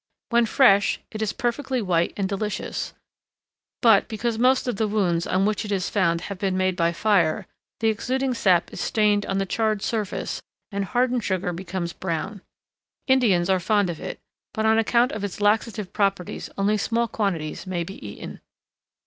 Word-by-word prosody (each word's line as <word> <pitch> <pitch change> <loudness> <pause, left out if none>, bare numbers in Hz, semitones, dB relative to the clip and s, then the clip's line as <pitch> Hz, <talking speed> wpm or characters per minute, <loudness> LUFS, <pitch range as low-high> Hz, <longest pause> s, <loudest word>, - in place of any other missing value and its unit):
When 235 -1 +3
fresh, 200 -6 +4
it 215 - -5
is 215 - 0
perfectly 260 +2 -1
white 175 -5 +1
and 195 -2 0
delicious, 205 +1 -3 0.9
but, 225 -4 +6
because 225 0 -2
most 255 +1 +3
of 245 - -1
the 220 - +1
wounds 180 -5 0
on 190 +1 +2
which 210 -1 0
it 210 - -5
is 190 -2 -1
found 170 -4 +2
have 195 +1 -6
been 190 -1 0
made 185 -1 +1
by 170 -2 +2
fire, 175 -4 +2 0.4
the 225 - +3
exuding 255 +4 -1
sap 190 -7 +2
is - - -5
stained 210 -2 +2
on 195 - -1
the 195 - 0
charred 215 0 0
surface, 215 -4 -2 0.3
and 200 -1 -2
the - - -12
hardened 245 +2 +1
sugar 185 -2 -1
becomes 170 0 -4
brown. 190 +3 -4 0.6
Indians 225 -10 +3
are 190 -1 +3
fond 200 0 +2
of 165 - -8
it, - - -6 0.4
but 220 -1 0
on 220 0 +4
account 235 +2 +3
of 210 - -5
its 205 -1 -4
laxative 210 -1 0
properties 195 -4 -1
only 205 +2 +2
small 230 +3 0
quantities 190 -7 -2
may 175 -2 -1
be 195 -4 -10
eaten. 100 -1 -8
205 Hz, 180 wpm, -24 LUFS, 185-225 Hz, 0.9 s, but